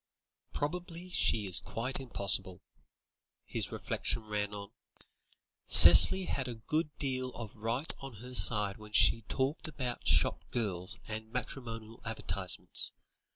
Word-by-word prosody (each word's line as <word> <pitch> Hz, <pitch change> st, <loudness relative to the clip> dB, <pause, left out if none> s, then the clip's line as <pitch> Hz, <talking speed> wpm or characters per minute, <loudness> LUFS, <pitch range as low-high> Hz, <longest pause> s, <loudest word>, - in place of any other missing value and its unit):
"Probably 175 Hz, +3 st, -7 dB
she 110 Hz, -10 st, 0 dB
is 95 Hz, -2 st, -3 dB
quite 125 Hz, +5 st, -5 dB
impossible," 100 Hz, -7 st, -1 dB, 0.8 s
his -, -, -5 dB
reflections 115 Hz, -, -4 dB
ran 105 Hz, -1 st, -4 dB
on. 100 Hz, -1 st, -10 dB, 1.0 s
"Cicely 190 Hz, 0 st, +10 dB
had 140 Hz, -6 st, -5 dB
a 120 Hz, -, -7 dB
good 150 Hz, +8 st, -4 dB
deal 130 Hz, -2 st, -4 dB
of 115 Hz, -3 st, -10 dB
right 115 Hz, +7 st, -5 dB
on 135 Hz, -2 st, -11 dB
her 125 Hz, +5 st, -13 dB
side 105 Hz, -5 st, +2 dB
when 105 Hz, -1 st, -15 dB
she 115 Hz, +2 st, +3 dB
talked 135 Hz, +5 st, -4 dB
about 130 Hz, -6 st, -7 dB
shop -, -, +2 dB
girls 95 Hz, -6 st, -5 dB
and 110 Hz, 0 st, -9 dB
matrimonial 115 Hz, -2 st, -8 dB
advertisements. 100 Hz, -4 st, -2 dB
115 Hz, 125 wpm, -30 LUFS, 105-135 Hz, 1.0 s, Cicely